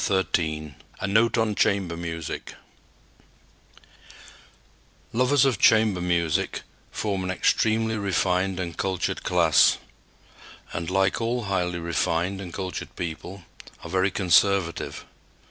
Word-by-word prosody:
XIII 80 -6 -1 0.3
A - - -2
NOTE 110 +5 +2
ON 110 -2 +1
CHAMBER 100 -5 +1
MUSIC 80 -2 -6 2.6
Lovers 130 +3 +3
of 125 -6 +1
chamber 110 -5 +4
music 85 -3 0 0.3
form 100 -3 -2
an 90 - -3
extremely 110 +4 +1
refined 95 -1 0
and 85 -3 -4
cultured 95 -3 -2
class, 85 -3 +4 1.0
and, 85 0 -3
like 95 +4 +1
all 120 +1 -1
highly 90 -3 -1
refined 85 +3 -1
and 90 -3 -7
cultured 95 0 -6
people, 85 +3 -6 0.4
are 85 - -8
very 95 +1 +2
conservative. 95 -1 +1
95 Hz, 110 wpm, -25 LUFS, 85-100 Hz, 2.6 s, chamber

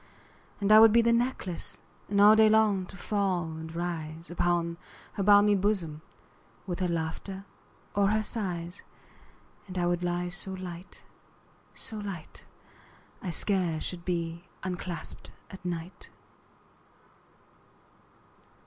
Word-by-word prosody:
And 200 0 +1
I 215 - +10
would 225 0 +9
be 235 +1 +5
the 235 0 +4
necklace, 235 -7 -1 0.3
And 200 0 +1
all 210 +1 +9
day 220 0 +6
long 210 -4 +3
to 195 - -12
fall 195 -3 0
and 160 +1 -8
rise 165 -1 -4
Upon 170 -1 0 0.4
her - - -3
balmy 205 +1 +6
bosom, 185 -6 0 0.6
15 - - -32
With 180 -2 -4
her 185 - +1
laughter 170 +4 -4 0.5
or 200 -1 +3
her 215 +1 +2
sighs: 180 -5 -4 0.9
And 185 -1 -7
I 175 - +1
would 175 0 +1
lie 175 0 -1
so 190 +2 -3
light, 180 -1 -8 0.7
so 220 -1 -1
light, 195 -6 -7 0.8
I 185 - -4
scarce 175 -3 +1
should 175 -2 -3
be 170 -1 -3 0.2
unclasp'd 180 -2 -5 0.2
at 190 - -11
night. 175 0 -5
185 Hz, 130 wpm, -29 LUFS, 170-205 Hz, 0.9 s, I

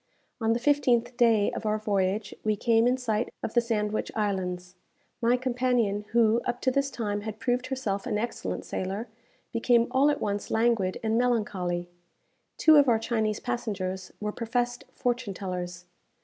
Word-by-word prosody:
On 225 0 +3
the 235 - 0
fifteenth 245 -3 +2
day 230 -4 +4
of - - -5
our 215 0 +1
voyage, 200 -1 -1
we 215 -1 +1
came 225 +2 +3
in 250 +1 +2
sight 230 -2 -1
of - - -3
the 240 - +4
Sandwich 215 -2 -1
Islands. 180 -4 -2 0.5
My 240 +2 +3
companion, 245 -5 0
who 230 0 +3
up 245 0 -2
to 260 - +2
this 275 +1 +1
time 210 -5 -3
had 215 0 -6
proved 245 +2 -1
herself 240 -7 -2
an 210 - 0
excellent 235 +3 -3
sailor, 195 +5 -4 0.4
became 235 0 +3
all 275 +3 +4
at 295 - 0
once 205 0 -2
languid 225 -5 +1
and 220 +1 +2
melancholy. 190 -8 0 0.7
Two 315 -1 +7
of 285 -3 +6
our 230 - +5
Chinese 220 -2 -1
passengers 195 -7 -3
were 210 0 -2
professed 245 +2 -2
fortune 245 -5 -1
tellers. 180 -2 -5
225 Hz, 165 wpm, -27 LUFS, 205-245 Hz, 0.7 s, Two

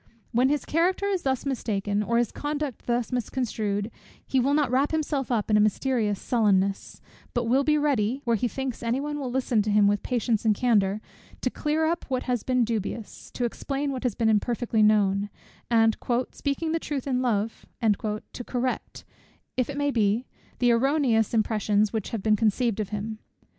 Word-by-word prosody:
When 250 +3 +3
his 295 0 0
character 360 +5 +1
is 390 -3 0
thus 265 -1 -1
mistaken, 210 -6 -1
or 235 +3 0
his 240 -2 +1
conduct 290 -3 -4
thus 240 0 0
misconstrued, 220 -4 -2 0.3
he 265 - +1
will 275 +3 +2
not 290 -5 +2
wrap 270 +3 +2
himself 295 -4 -1
up 220 -2 0
in 210 - +5
a - - +5
mysterious 215 -1 +1
sullenness; 200 -4 +1 0.3
but 240 - +1
will 255 +4 +2
be 300 +1 +3
ready, 265 -5 +1
where 235 -2 +2
he 245 +3 0
thinks 265 +1 -4
any 235 +2 0
one 295 +1 -3
will 265 -3 -3
listen 245 -3 +1
to 210 - -2
him 205 0 +4
with 205 0 +2
patience 235 -3 0
and 215 -2 +3
candour, 210 -3 +2 0.4
to - - 0
clear 310 +1 0
up 335 +2 -1
what 260 -2 -1
has 245 -3 -1
been 255 -2 +1
dubious, 220 -1 -4
to 245 - 0
explain 275 +4 -2
what 260 -2 -4
has 250 -5 -1
been 225 - +1
imperfectly 220 +1 +1
known, 205 -1 +3 0.4
and 225 -2 +4 0.4
"speaking 300 +3 -2
the 330 - 0
truth 285 -5 -4
in 255 -2 0
love" 225 -3 -1
to 215 +1 -1
correct, 250 +1 -3 0.5
if 255 0 0
it 285 - -5
may 285 0 +1
be, 220 0 +1 0.3
the 245 -1 +3
erroneous 240 -3 +2
impressions 215 -2 +1
which 220 -3 -2
have 220 -4 -4
been 215 -1 +4
conceived 225 +1 +1
of 210 -3 -2
him. 215 +1 -4
240 Hz, 185 wpm, -26 LUFS, 215-270 Hz, 0.5 s, in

